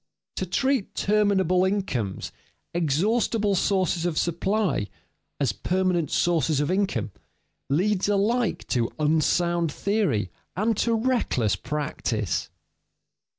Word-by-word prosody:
To 185 - -2
treat 260 +4 0
terminable 195 -3 +2
incomes, 185 - -2 0.4
exhaustible 200 - +1
sources 185 -3 +1
of 175 -3 -1
supply, 185 - 0 0.5
as 135 -7 +1
permanent 180 - 0
sources 165 -4 +1
of 145 +4 0
income, 190 - 0 0.6
leads 190 +7 +1
alike 210 +2 +1
to 120 -2 +1
unsound 160 +2 +1
theory 190 - 0 0.2
and 215 +5 +1
to 230 +1 +2
reckless 220 - +1
practice. 130 - -2
180 Hz, 100 wpm, -25 LUFS, 150-205 Hz, 0.6 s, terminable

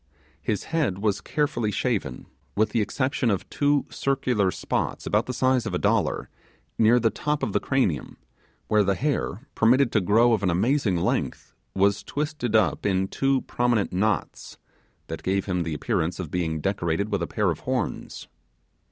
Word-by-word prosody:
His 105 - -1
head 155 - -1
was 100 0 0
carefully 145 -8 -1
shaven 100 - -2 0.3
with 110 +1 +2
the 115 - +1
exception 130 +3 0
of 100 -3 -1
two 145 0 +2
circular 125 -7 +1
spots, - - -2
about 105 +2 +1
the - - -2
size 130 0 +1
of - - -2
a - - +2
dollar, - - +1 0.5
near 115 +2 +5
the 115 -1 +2
top 150 0 -2
of - - -1
the - - +3
cranium, 110 - -1 0.5
where 105 -1 +4
the 100 0 +1
hair, 140 - -2
permitted 120 +2 +4
to 110 - +2
grow 115 +5 +4
of 110 - +1
an 95 - +1
amazing 105 +2 +1
length, 85 - -2 0.2
was 100 +1 +2
twisted 145 -6 -3
up 110 -5 +2
in 95 -1 +1
two 135 -1 +1
prominent 120 -6 0
knots, 105 +4 -1 0.5
that - - -6
gave 95 +1 0
him 90 -3 -1
the 80 -2 -2
appearance 80 +4 -1
of 85 -5 -5
being 80 -3 -1
decorated 95 +2 -1
with 100 -3 0
a 85 - -1
pair - - +1
of - - -4
horns. - - -3
110 Hz, 170 wpm, -25 LUFS, 95-130 Hz, 0.5 s, near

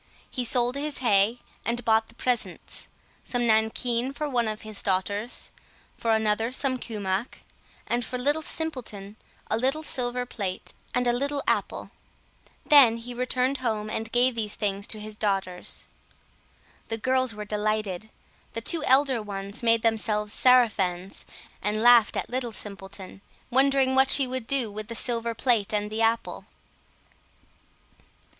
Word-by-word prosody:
He 255 - -2
sold 245 +1 +2
his 290 +1 -3
hay, 220 -1 +3 0.3
and 240 0 -2
bought 220 0 +3
the - - -17
presents: 250 -2 -2 0.4
some 245 -1 -1
nankeen 230 +3 +2
for 300 +1 -3
one 245 -5 +1
of 215 0 -3
his 215 -2 -5
daughters, 200 +4 -1 0.4
for 230 - -3
another 220 +2 +1
some 260 0 +1
kumach, 205 -1 -3 0.4
and 240 +1 0
for 250 - -4
Little 290 +5 +1
Simpleton 245 -12 -5 0.4
a - - +3
little 270 +6 0
silver 250 -3 -2
plate 195 -6 -5 0.2
and 250 0 +1
a 240 - +3
little 280 +3 -1
apple. - - -1 0.7
Then 260 -6 +7
he 240 +2 -8
returned 255 +2 0
home 215 -4 -2
and 225 +1 -3
gave 245 +1 +3
these 215 -3 -2
things 200 -1 -2
to 215 - -3
his 215 0 -8
daughters. 195 -4 -2 1.0
The 225 - -3
girls 255 0 +1
were 210 0 -6
delighted; 210 -1 -2 0.4
the 230 - -3
two 320 +6 0
elder 265 -2 +4
ones 200 -1 -5
made 230 -1 +3
themselves 215 -2 +1
sarafans, 195 -8 +3 0.4
and 210 +2 0
laughed 240 -2 +6
at - - -2
Little 245 -2 -2
Simpleton, 195 -2 -8 0.3
wondering 270 0 +3
what 265 0 +5
she 275 - +6
would 255 -2 -4
do 260 -6 +2
with 210 +1 -6
the 230 - -5
silver 230 0 -1
plate 225 -4 +1
and 210 0 -1
the 220 +1 -2
apple. 225 +1 0
230 Hz, 150 wpm, -26 LUFS, 210-255 Hz, 1.0 s, Then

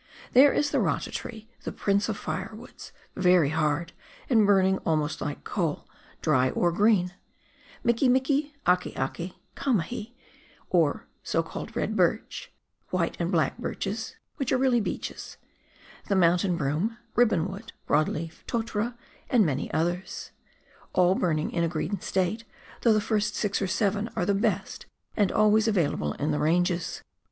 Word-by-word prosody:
There 275 +3 +8
is 290 -1 +1
the - - +2
rata - - 0
tree, 220 -2 -7
the - - -5
prince 200 0 0
of - - -2
firewoods, - - -6 0.2
very 180 -5 +4
hard, 155 +1 0 0.4
and 220 -4 +5
burning 190 -1 +4
almost 155 -1 -1
like 145 - -4
coal, 165 -7 -2 0.4
dry 130 -5 +3
or 175 +5 +1
green, 185 -1 +3 0.7
miki 235 +2 +3
miki, 280 +3 +1
ake 180 0 +2
ake, 170 +7 -3 0.2
kamahi, 230 - -1 0.6
or - - +2 0.2
so - - 0
called - - -7
red - - -1
birch, - - 0 0.4
white - - 0
and - - -1
black - - +1
birches - - -4 0.2
(which 275 -4 -2
are - - +4
really 255 -2 +3
beeches), - - -5 0.7
the 200 - +1
mountain 175 0 +3
broom, 165 +10 -1 0.2
ribbon 210 -8 +3
wood, 200 +4 -8
broad 155 +1 +3
leaf, 160 +1 -6
totara, 235 0 -2 0.3
and 235 -6 +4
many 145 -2 -2
others, 175 +3 -2 0.6
all 180 0 +4
burning 160 -5 0
in 170 - 0
a - - +2
green 175 +4 -2
state, 190 +4 -1 0.4
though 230 - +4
the 215 - +2
first 215 0 0
six 205 -2 -1
or 195 - 0
seven 205 +3 0
are 175 - 0
the 200 - +2
best, 200 -1 -1 0.3
and 205 -4 +2
always 215 +1 +4
available 150 - +1
in 150 +2 -1
the 150 - 0
Ranges. 175 +2 0
190 Hz, 150 wpm, -27 LUFS, 170-220 Hz, 0.7 s, There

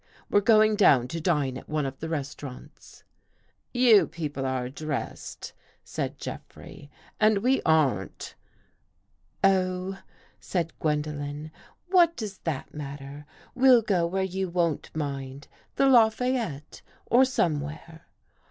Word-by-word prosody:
We're 205 - +4
going 215 0 +4
down 135 - +5
to 165 +3 -4
dine 145 -7 0
at - - -17
one 150 -1 -1
of 135 0 -6
the 160 - -5
restau 145 -2 -4
rants." 140 +4 -15 0.7
"You 245 -4 +5
people 145 -5 -4
are 130 -1 -2
dressed," 150 +2 -6 0.3
said - - -4
Jeffrey, 145 - -10 0.3
"and 215 -1 +4
we 260 +2 +3
aren't." 135 - +1 1.1
"Oh," 190 0 +1 0.4
said 170 -3 -3
Gwendolen, 150 0 -3 0.4
"what 345 -3 +5
does 205 -4 -6
that 155 -5 -4
mat 145 -2 -6
ter? 140 +1 -10 0.3
We'll 255 -3 +5
go 180 -5 +1
where 190 +2 -1
you 190 0 -2
won't 170 -3 -1
mind 140 -2 -5
— - - -36
the 275 - +3
La 240 -5 +6
fayette 225 - -3 0.2
or 245 +2 +5
somewhere." 160 - -2
160 Hz, 130 wpm, -26 LUFS, 145-210 Hz, 1.1 s, La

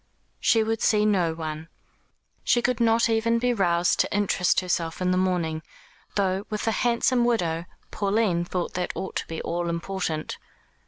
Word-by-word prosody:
She 225 -1 +3
would 225 0 -2
see 210 -1 +3
no 180 -6 +2
one. 155 -1 -5 0.8
She 240 - +2
could 250 -1 +1
not 230 0 +3
even 230 +1 +2
be 245 +1 +1
roused 175 -4 +2
to - - +1
interest 205 -3 +2
herself 170 -2 -2
in 180 0 +1
the - - +2
mourning, 175 -4 0 0.5
though, 195 -1 +1
with 210 -1 -3
a - - +3
handsome 240 +2 +2
widow, 175 -9 0 0.3
Pauline 200 -4 +1
thought 175 0 -3
that 180 0 -2
ought 190 - -5
to - - -4
be 160 - -5
all 170 0 -2
important. 170 -2 -3
190 Hz, 165 wpm, -25 LUFS, 170-225 Hz, 0.8 s, She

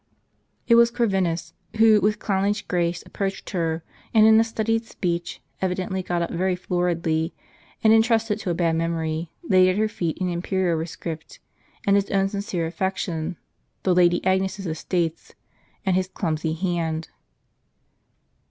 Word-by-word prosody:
It 235 - +5
was 235 0 +7
Corvinus, 190 -8 0 0.2
who 220 -1 +6
with 210 +1 +2
clownish 200 +1 0
grace 175 -1 -1
approached 195 -1 -4
her, 165 -3 -1 0.3
and 215 -1 +7
in 220 0 +7
a - - +5
studied 225 0 -1
speech, 175 -4 -3 0.2
evidently 185 0 -1
got 175 -1 -1
up - - -4
very 185 +2 0
floridly, 170 -2 -1 0.5
and 220 0 +6
intrusted 225 -1 +3
to 190 - -4
a 170 - 0
bad 165 -1 +1
memory, 165 -1 -2
laid 185 - +5
at 185 - 0
her 215 +1 +2
feet 170 -6 -3
an 185 - 0
imperial 180 0 0
rescript, 165 0 -6 0.5
and 200 - +4
his 200 0 +1
own 195 0 +2
sincere 200 -4 -2
affec 190 +3 -2
tion, 165 -1 -3 0.5
the 185 - +3
Lady 175 0 +3
Agnes's 190 +1 0
estates, 165 0 -2 0.5
and 190 -2 +2
his 185 0 +1
clumsy 160 -4 -2
hand. 165 -2 -2
185 Hz, 150 wpm, -24 LUFS, 170-200 Hz, 0.5 s, was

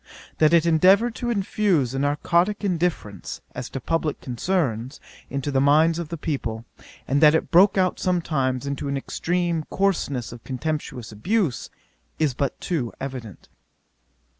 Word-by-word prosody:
That 155 0 +5
it 170 -1 +4
endeavoured 190 +8 +4
to 240 - -3
infuse 195 - +1
a 135 - -2
narcotick 170 +8 +1
indifference, 170 - -2
as - - -6
to 135 - -5
publick 160 +2 -1
concerns, 130 - -2 0.3
into 140 +1 -3
the 135 -1 +2
minds 155 +4 +4
of 170 -3 -5
the 170 - -4
people, 120 -8 -3 0.4
and 140 +3 +1
that 155 0 +7
it - - -1
broke 190 +4 +6
out 185 -1 +1
sometimes 145 -8 0
into 140 0 -3
an 140 0 -1
extreme 170 +3 -1
coarseness 165 -11 -1
of 120 -1 -11
contemptuous 130 -4 -4
abuse, 165 - -1 0.5
is 155 -4 +1
but 135 +1 -2
too 145 -10 -2
evident. 130 -8 -7
155 Hz, 145 wpm, -24 LUFS, 130-175 Hz, 0.5 s, that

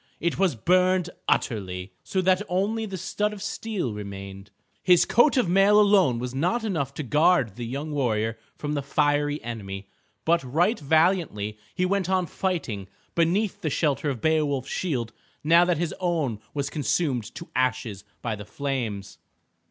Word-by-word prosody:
It 170 +1 -1
was 190 -8 +2
burned 180 +6 +2 0.2
utterly, 95 -4 -1
so 190 - -1
that 185 +1 +3
only 210 +5 0
the 195 -2 -5
stud 210 +4 -1
of 205 - -9
steel 210 - -3
remained. 100 -1 -8 0.3
His 180 -2 +5
coat 265 +4 +4
of 245 - +3
mail 195 +4 +5
alone 200 - +4
was 125 +1 -4
not 180 - 0
enough 150 -10 -2
to 150 - -3
guard 150 - +3
the 120 -1 -5
young 140 +5 -4
warrior 115 -6 0 0.2
from 150 0 -3
the 145 - -1
fiery 145 +1 +1
enemy. 100 -4 -6 0.4
But 170 0 +3
right 170 - +1
valiantly 150 - +1 0.2
he 180 - +1
went 190 -1 0
on 185 -1 +2
fighting 145 - -3 0.3
beneath 190 +5 +1
the 160 - -1
shelter 150 0 0
of 125 -5 -4
Beowulf's 150 -4 +1
shield 125 -10 -2 0.3
now 170 +3 +6
that 175 -2 +1
his 170 0 -1
own 160 - 0
was 140 -1 -3
consumed 140 - -1
to 170 - -8
ashes 120 -6 -1 0.2
by 115 -3 -1
the 105 - -8
flames. 110 -8 -4
150 Hz, 160 wpm, -25 LUFS, 120-185 Hz, 0.4 s, now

